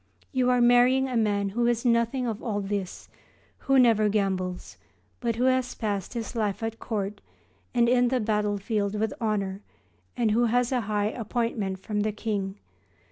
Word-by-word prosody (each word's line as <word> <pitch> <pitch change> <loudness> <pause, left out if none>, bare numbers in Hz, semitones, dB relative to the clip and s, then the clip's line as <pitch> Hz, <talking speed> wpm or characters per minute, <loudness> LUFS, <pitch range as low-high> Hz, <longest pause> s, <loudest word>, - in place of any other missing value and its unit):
You 255 -2 +2
are 250 -1 +3
marrying 245 +2 +5
a 255 - -3
man 205 -3 +1
who 235 +4 0
is 240 0 0
nothing 235 +2 +2
of 225 -2 -3
all 215 -4 -2
this, 200 -2 -4 0.5
who 270 0 +2
never 225 -4 +5
gambles, 190 -3 -2 0.4
but 235 -2 -1
who 240 - -1
has 255 -1 +1
passed 205 -1 -3
his 230 +1 -4
life 215 -1 -1
at 225 0 -3
court 205 -2 -3 0.5
and 240 -1 +3
in 245 0 +4
the 255 +1 +1
battlefield 210 -1 -1
with 220 -1 0
honour 200 -3 -1 0.6
and 230 -3 +2
who 235 +3 +3
has 245 +2 +1
a 255 -2 +1
high 210 0 +1
appointment 225 -4 -2
from 210 0 -3
the 215 +1 +1
King. 205 -2 -3
220 Hz, 170 wpm, -26 LUFS, 205-240 Hz, 0.6 s, marrying